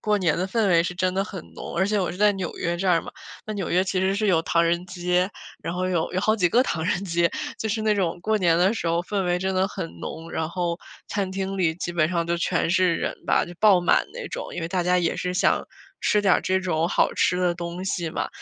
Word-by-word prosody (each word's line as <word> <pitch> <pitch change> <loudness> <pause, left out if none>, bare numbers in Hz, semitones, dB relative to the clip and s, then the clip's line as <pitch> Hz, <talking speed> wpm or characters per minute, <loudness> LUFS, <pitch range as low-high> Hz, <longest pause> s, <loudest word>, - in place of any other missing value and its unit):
过 210 -1 +1
年 170 -4 +1
的 185 - 0
氛 215 0 +1
围 170 -2 +5
是 180 +1 -3
真 185 +1 0
的 195 +1 +1
很 190 -5 -8
浓。 - - -7
而 190 - +3
且 210 0 +1
我 180 - -1
是 - - -8
在 210 0 +5
纽 190 -4 -5
约 170 +1 -1
这 190 +2 -1
儿 170 -2 +4
嘛， - - -8 0.4
那 215 - -3
纽 195 -4 -3
约 180 +2 +3
其 185 -1 -1
实 190 +1 +1
是 210 +2 0
有 170 -4 +4
唐 170 0 +2
人 170 +2 0
街， 180 0 0 0.3
然 170 - -3
后 185 +1 -1
有 175 -2 -1
有 185 - 0
好 215 +2 +2
几 180 -4 +3
个 245 +6 +4
唐 160 -10 -2
人 185 +1 0
街。 170 -1 +1 0.3
就 220 - -2
是 220 +1 -1
那 215 -1 +3
种 180 -4 -1
过 215 +1 +1
年 170 -4 +3
的 185 +4 +4
时 175 - -4
候 170 +1 +1
氛 195 +1 -2
围 175 0 +1
真 190 +1 -1
的 190 +1 +2
很 85 - -4
浓， 165 +1 -7
然 160 -1 -2
后 170 -1 -2 0.3
餐 195 -2 -2
厅 195 0 -3
里 160 -3 +2
基 175 0 -4
本 155 -2 +2
上 170 -2 -1
都 170 0 0
全 170 - 0
是 180 -1 +3
人 - - -2
吧， - - +3
就 175 - -10
爆 200 -4 +6
满 175 - +3
那 - - -6
种， - - -6
因 - - -4
为 - - -1
大 180 0 0
家 180 +1 +2
也 170 -2 0
是 180 - -2
想 - - +2 0.4
吃 210 - +2
点 195 -3 +5
儿 - - +2
这 190 0 +1
种 165 -3 0
好 - - +2
吃 180 - +2
的 180 -1 +1
东 170 +1 -5
西 175 -4 -2
嘛。 - - -2
180 Hz, 295 characters per minute, -24 LUFS, 170-195 Hz, 0.4 s, 爆